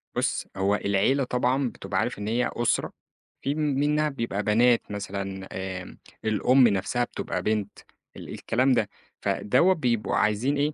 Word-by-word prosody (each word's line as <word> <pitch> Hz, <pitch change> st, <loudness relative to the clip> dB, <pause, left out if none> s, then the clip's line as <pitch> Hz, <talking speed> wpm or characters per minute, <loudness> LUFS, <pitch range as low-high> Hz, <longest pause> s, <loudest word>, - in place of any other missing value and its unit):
بُص، -, -, -1 dB
هو 100 Hz, +2 st, +2 dB
العيلة 105 Hz, +8 st, +1 dB
طبعًا 125 Hz, +1 st, +1 dB
بتبقى 95 Hz, -4 st, -3 dB
عارف 115 Hz, +1 st, -2 dB
إن 105 Hz, -, -4 dB
هي 120 Hz, +3 st, 0 dB
أسرة، 120 Hz, -1 st, 0 dB, 0.5 s
في 140 Hz, +2 st, -1 dB
م -, -, -6 dB
منّها 150 Hz, +1 st, +1 dB
بيبقى 115 Hz, -7 st, -3 dB
بنات 115 Hz, +2 st, +3 dB
مثلًا 100 Hz, -1 st, -5 dB, 0.3 s
آمم 90 Hz, -, -12 dB, 0.3 s
الأم 125 Hz, +4 st, +4 dB
نفسها 105 Hz, +4 st, 0 dB
بتبقى 90 Hz, -6 st, -4 dB
بنت 105 Hz, -1 st, -1 dB, 0.4 s
ال -, -, -10 dB
الكلام 130 Hz, +4 st, +1 dB
ده. 110 Hz, -4 st, +1 dB, 0.3 s
فدوّة 150 Hz, -, +3 dB
بيبقوا 120 Hz, -8 st, 0 dB
عايزين 110 Hz, +7 st, +1 dB
إيه، 145 Hz, +2 st, +1 dB
120 Hz, 150 wpm, -26 LUFS, 105-135 Hz, 0.5 s, الأم